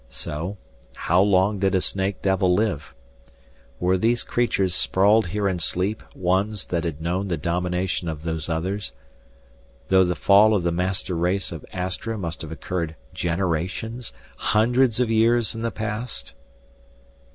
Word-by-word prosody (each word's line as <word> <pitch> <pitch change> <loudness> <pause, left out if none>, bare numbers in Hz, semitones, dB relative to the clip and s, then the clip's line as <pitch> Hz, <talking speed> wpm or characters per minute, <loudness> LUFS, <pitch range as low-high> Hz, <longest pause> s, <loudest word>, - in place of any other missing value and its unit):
So, 80 +10 -5 0.4
how - - +2
long 100 +1 +3
did 95 0 +2
a - - +4
snake 95 +1 -2
devil 95 -1 +2
live? 105 -8 -1 0.8
Were 90 +1 +2
these 120 +4 +2
creatures 100 -6 +1
sprawled 100 +3 +3
here 100 +3 -1
in 95 -2 -1
sleep 95 +6 -1
ones 95 +3 0
that 85 -1 -2
had 80 -2 -4
known 90 +4 -1
the 85 -3 -1
domination 90 +2 -1
of 80 -1 -6
Those 80 -1 -3
Others 95 +2 -2 1.0
though 95 0 +6
the 90 -1 0
fall 105 +2 +5
of 95 - 0
the 85 - +1
master 90 +1 -1
race 90 +3 0
of 85 -3 -7
Astra 95 +5 -3
must 85 -5 -5
have 80 - -7
occurred 85 0 -3 0.2
generations, 95 +7 -2 0.3
hundreds 120 +2 +2
of 120 -3 +1
years 115 +1 +3
in 115 - -6
the 115 - 0
past? 110 - -5
95 Hz, 150 wpm, -24 LUFS, 85-105 Hz, 1.0 s, though